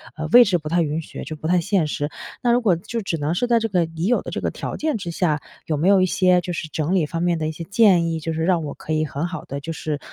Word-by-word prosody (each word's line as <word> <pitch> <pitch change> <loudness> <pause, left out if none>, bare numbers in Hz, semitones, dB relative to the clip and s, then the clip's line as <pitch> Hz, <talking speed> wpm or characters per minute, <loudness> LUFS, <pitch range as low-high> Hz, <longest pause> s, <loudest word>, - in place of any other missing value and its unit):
呃， 155 - -4
位 245 0 +9
置 190 -4 +2
不 155 -2 -6
太 170 +2 +2
允 155 0 -1
许， - - -8
就 155 - -6
不 155 - -11
太 180 0 +3
现 170 -1 +1
实。 145 0 -2 0.3
那 240 - +2
如 245 - +3
果 195 -6 +3
就 230 +7 -5
只 185 -5 -2
能 155 +3 -1
是 245 - +1
在 235 -1 +4
这 225 - -1
个 185 -5 +1
已 165 +1 -5
有 245 - +2
的 - - -7
这 - - -3
个 - - 0
条 - - -5
件 310 -2 -1
之 170 -4 -5
下， 155 -4 0 0.2
有 155 - -1
没 165 +6 +1
有 195 -2 +5
一 - - +4
些 185 0 +3
就 175 0 -4
是 160 - -4
整 160 +4 -1
理 175 -5 +2
方 165 +2 -4
面 175 -1 +1
的 155 -1 -2
一 - - -3
些 160 +2 -7
建 190 -4 +4
议， 165 - -2
就 165 +1 -3
是 160 0 -2
让 175 -2 +2
我 145 -2 -5
可 155 - -5
以 155 0 +1
很 145 +3 -3
好 180 - -6
地 140 +1 -6
就 165 +3 -5
是， 150 -1 -3
170 Hz, 345 characters per minute, -22 LUFS, 155-185 Hz, 0.3 s, 位